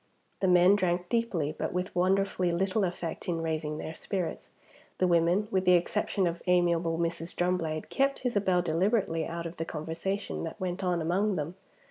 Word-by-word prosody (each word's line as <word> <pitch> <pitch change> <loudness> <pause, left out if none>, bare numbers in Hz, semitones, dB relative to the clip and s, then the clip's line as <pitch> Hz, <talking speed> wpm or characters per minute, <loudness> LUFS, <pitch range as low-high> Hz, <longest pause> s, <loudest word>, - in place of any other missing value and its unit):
The 190 - +1
men 180 +2 +6
drank 180 -2 0
deeply, 200 -11 0
but - - -3
with 180 +1 -3
wonderfully 185 0 +2
little 190 +4 +1
effect 175 -2 -3
in 170 -1 0
raising 155 -1 -2
their 160 - -5
spirits; 180 +1 -4 0.5
the 185 - +2
women, 175 +4 +3
with 190 -1 +1
the 180 -1 +5
exception 190 +2 0
of 170 0 -2
amiable 170 -2 +2
Mrs. 170 0 -3
Drumblade, 175 -3 -1
kept 275 -1 0
Isabel 195 -6 +2
deliberately 175 -1 +1
out 170 0 -5
of 170 +1 -6
the 165 - -2
conversation 165 +6 -3
that 165 +5 -6
went 185 0 -3
on 175 -3 0
among 190 +5 +1
them. 155 +1 -3
175 Hz, 170 wpm, -29 LUFS, 165-190 Hz, 0.5 s, men